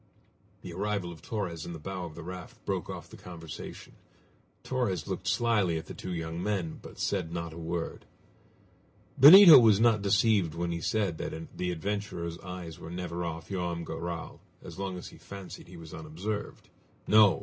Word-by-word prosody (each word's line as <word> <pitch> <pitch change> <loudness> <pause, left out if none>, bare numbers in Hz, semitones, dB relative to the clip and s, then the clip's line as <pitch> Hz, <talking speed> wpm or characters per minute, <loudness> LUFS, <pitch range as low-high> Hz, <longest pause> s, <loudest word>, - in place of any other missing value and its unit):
The 85 - -7
arrival 100 -1 -2
of 80 -2 -12
Torres 85 -8 -4
in 85 - -6
the - - -6
bow 95 +2 -5
of 80 -2 -9
the 85 - -8
raft 90 0 -9
broke - - -2
off - - -6
the - - -13
conversation. 85 -3 -9 0.7
Torres 100 -11 -1
looked - - -4
slyly 105 -8 +2
at 80 - -6
the - - -8
two 95 - -6
young 80 0 -4
men, 95 -5 -2
but - - -12
said 90 -5 -1
not 85 -1 -4
a - - -10
word. 85 0 -4 1.1
Benito 165 +1 +12
was 110 -4 +5
not 115 -2 +4
deceived 100 -4 +3
when 85 0 -2
he 85 0 -3
said 100 -4 0
that 80 0 -6
the 90 - -2
adventurer's 85 -2 -3
eyes 90 -2 -8
were 80 - -8
never 90 0 -4
off 80 -1 -5
Joam 90 -3 -2
Garral 85 0 -5 0.2
as - - -10
long 95 -2 -3
as 90 - -8
he - - -15
fancied 100 -3 -9
he 90 0 -12
was 80 -1 -11
unobserved. 85 +7 -5 0.4
No! 105 -2 +6
90 Hz, 180 wpm, -29 LUFS, 85-100 Hz, 1.1 s, Benito